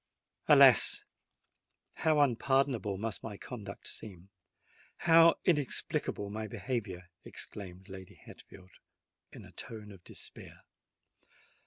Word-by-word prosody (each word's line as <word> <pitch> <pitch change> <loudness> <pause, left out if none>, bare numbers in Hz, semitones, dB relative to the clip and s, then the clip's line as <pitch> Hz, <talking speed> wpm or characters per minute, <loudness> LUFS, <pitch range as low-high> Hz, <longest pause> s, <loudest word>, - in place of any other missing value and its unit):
"Alas! - - +6 0.9
how 155 -2 +2
unpardonable 130 -5 +1
must 110 0 -3
my 105 -3 -7
conduct 105 -5 -9
seem—how 100 - 0
inexplicable 140 - 0
my 110 +1 -5
behaviour!" 100 -7 -5
exclaimed 95 -1 -8
Lady 95 -2 -11
Hatfield, 95 -1 -16 0.6
in - - -12
a - - -15
tone 105 -2 -9
of 95 -3 -15
despair. - - -9
105 Hz, 95 wpm, -31 LUFS, 95-130 Hz, 0.9 s, Alas